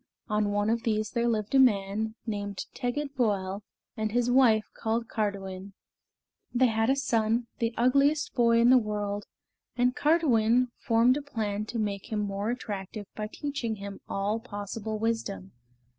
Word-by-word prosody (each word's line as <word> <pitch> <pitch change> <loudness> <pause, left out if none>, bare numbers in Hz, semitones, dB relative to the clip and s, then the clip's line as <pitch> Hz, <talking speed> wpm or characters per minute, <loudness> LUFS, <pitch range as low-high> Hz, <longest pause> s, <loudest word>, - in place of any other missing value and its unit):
On 210 -1 +1
one 205 +1 +1
of 230 0 0
these 215 -2 -1
there 235 -1 0
lived 215 -1 -1
a 270 - +6
man 215 -2 +2
named 205 -3 -4
Tegid 275 +3 -3
Voel 200 -5 0 0.3
and 215 -1 -2
his 245 +1 +1
wife 240 -4 +5
called 230 +1 -1
Cardiwen. 195 -3 -3 0.8
They 255 +1 +3
had 225 +1 +1
a 270 - +4
son, 230 -3 +1
the 230 0 -1
ugliest 280 +5 +3
boy 235 -2 +4
in 235 +2 +6
the 255 - +7
world, 205 -2 -3 0.5
and 250 0 +2
Cardiwen 250 -6 +3
formed 240 +1 +3
a - - -3
plan 215 -7 -3
to 235 - -4
make 205 0 -3
him 215 -1 0
more 200 +1 -2
attractive 210 -4 -5
by 215 0 -4
teaching 280 -6 -3
him 200 -1 -8
all 205 +3 -1
possible 215 -1 -5
wisdom. 215 - -2
220 Hz, 160 wpm, -28 LUFS, 205-245 Hz, 0.8 s, the